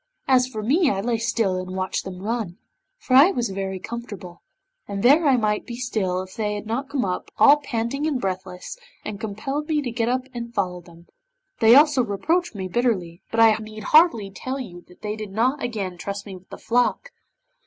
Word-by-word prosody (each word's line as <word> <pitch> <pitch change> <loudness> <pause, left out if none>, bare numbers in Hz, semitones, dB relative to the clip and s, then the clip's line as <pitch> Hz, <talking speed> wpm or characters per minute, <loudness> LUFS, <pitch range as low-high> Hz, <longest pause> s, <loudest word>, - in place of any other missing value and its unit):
As 255 -1 +4
for 220 -4 -6
me 295 - +3
I 195 - -1
lay 230 +2 -1
still 225 -5 0
and 185 0 -6
watched 190 0 -2
them 185 0 -7
run, 215 -5 -3 0.4
for 265 - -4
I 280 +7 +8
was 240 - -1
very 190 0 -3
comfortable, 205 -5 -8 0.5
and 200 -1 -4
there 290 +6 +6
I 265 -2 +5
might 210 -2 0
be 240 - -5
still 195 -7 -1
if 185 - -13
they 210 -2 -1
had 205 - -6
not 240 +5 -3
come 270 -6 -1
up, 180 -1 -3
all 290 - +7
panting 275 +1 -2
and 285 -5 0
breathless, 185 - -5 0.3
and 210 -2 -5
compelled 245 +8 -4
me 305 -1 +2
to 245 - -3
get 230 0 -1
up 255 +1 0
and 235 -1 -6
follow 180 -3 -1
them; 170 0 -17 0.5
they 225 +1 +7
also 290 -2 +6
reproached 320 - -1
me 190 -2 -4
bitterly, 185 -6 -1
but 230 - -2
I 225 -1 +7
need 215 0 -9
hardly 300 - +4
tell 260 +7 -5
you 175 -9 -8
that 180 - -20
they 210 0 -2
did 215 -2 -7
not 255 +7 +1
again 215 -6 -3
entrust 200 +3 -6
me 195 -2 -8
with 185 0 -15
the - - -8
flock. 245 - 0
225 Hz, 205 wpm, -23 LUFS, 195-255 Hz, 0.5 s, I